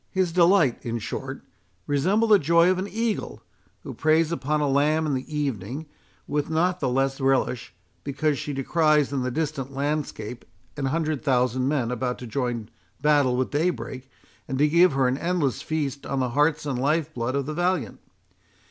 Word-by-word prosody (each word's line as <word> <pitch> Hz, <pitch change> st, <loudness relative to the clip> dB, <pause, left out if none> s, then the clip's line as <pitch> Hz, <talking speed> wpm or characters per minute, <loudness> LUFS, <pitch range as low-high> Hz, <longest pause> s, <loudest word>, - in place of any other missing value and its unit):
His 185 Hz, -3 st, 0 dB
delight, 170 Hz, -6 st, +3 dB
in 120 Hz, 0 st, -2 dB
short, 135 Hz, +4 st, -5 dB, 0.4 s
resembled 195 Hz, +11 st, +1 dB
the 205 Hz, -, +8 dB
joy 170 Hz, +4 st, +4 dB
of 185 Hz, -, 0 dB
an 190 Hz, -, -3 dB
eagle, 225 Hz, +1 st, -3 dB, 0.4 s
who -, -, -7 dB
preys 160 Hz, +1 st, +2 dB
upon 150 Hz, 0 st, -1 dB
a 150 Hz, -, +1 dB
lamb 150 Hz, +3 st, +2 dB
in 150 Hz, -, 0 dB
the 135 Hz, +4 st, -4 dB
evening 135 Hz, -, -3 dB, 0.4 s
with 145 Hz, 0 st, -2 dB
not 175 Hz, +3 st, +1 dB
the 135 Hz, -, 0 dB
less 135 Hz, +2 st, 0 dB
relish, 135 Hz, -2 st, +1 dB, 0.3 s
because 145 Hz, +1 st, -1 dB
she 150 Hz, -, -4 dB
descries 150 Hz, +1 st, +2 dB
in 135 Hz, -, 0 dB
the 125 Hz, -, -1 dB
distant 140 Hz, -1 st, -3 dB
landscape 140 Hz, -5 st, -3 dB, 0.3 s
an 145 Hz, -, -3 dB
hundred 155 Hz, +1 st, -1 dB
thousand 130 Hz, -2 st, +1 dB
men 135 Hz, -5 st, 0 dB
about 125 Hz, 0 st, -2 dB
to 125 Hz, -, -8 dB
join 120 Hz, -2 st, -3 dB, 0.3 s
battle 145 Hz, -4 st, +3 dB
with 130 Hz, -, -1 dB
daybreak, 145 Hz, -4 st, -2 dB, 0.4 s
and 130 Hz, -, -3 dB
to 150 Hz, +2 st, +4 dB
give 170 Hz, +1 st, +5 dB
her 135 Hz, -1 st, +2 dB
an 130 Hz, +2 st, -1 dB
endless 170 Hz, -7 st, 0 dB
feast 145 Hz, -3 st, -3 dB
on 135 Hz, -, -1 dB
the 130 Hz, -1 st, 0 dB
hearts 150 Hz, +4 st, +1 dB
and 135 Hz, -4 st, -2 dB
lifeblood 140 Hz, -3 st, 0 dB
of 140 Hz, -1 st, -1 dB
the 155 Hz, -, -4 dB
valiant. 175 Hz, -, -1 dB
145 Hz, 175 wpm, -25 LUFS, 130-160 Hz, 0.4 s, the